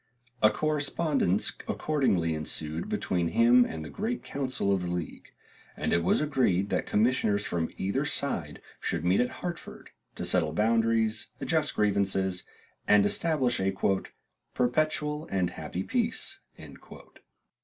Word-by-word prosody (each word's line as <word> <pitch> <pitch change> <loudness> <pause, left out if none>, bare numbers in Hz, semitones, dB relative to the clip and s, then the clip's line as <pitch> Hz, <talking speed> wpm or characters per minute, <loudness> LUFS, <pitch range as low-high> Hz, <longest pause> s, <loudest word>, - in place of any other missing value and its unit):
A 110 - +7
correspondence 145 - 0 0.2
accordingly 100 - +1
ensued 75 +1 -4
between 85 -2 0
him 120 +8 +5
and 80 -7 -5
the - - -7
great 225 +4 -3
council 130 -7 -2
of 95 - 0
the 90 - -3
league, 85 -3 -5 0.5
and - - -1
it 85 - +3
was 90 - +3
agreed 120 -10 +1
that - - 0
commissioners 105 -2 +2
from 85 -2 -1
either 100 +9 0
side 115 - -3 0.2
should 85 0 -2
meet 90 +2 +3
at 125 - +2 0.2
Hartford, 175 -1 -7 0.2
to - - -4
settle 80 -4 +1
boundaries, 115 +2 +2
adjust - - 0
grievances, 95 -3 +1 0.5
and 105 -1 +6
establish 130 +1 +1
a 95 0 0 0.8
"perpetual 150 +4 0
and 90 -2 0
happy 90 - -5
peace." 235 - -2
105 Hz, 130 wpm, -28 LUFS, 90-140 Hz, 0.8 s, A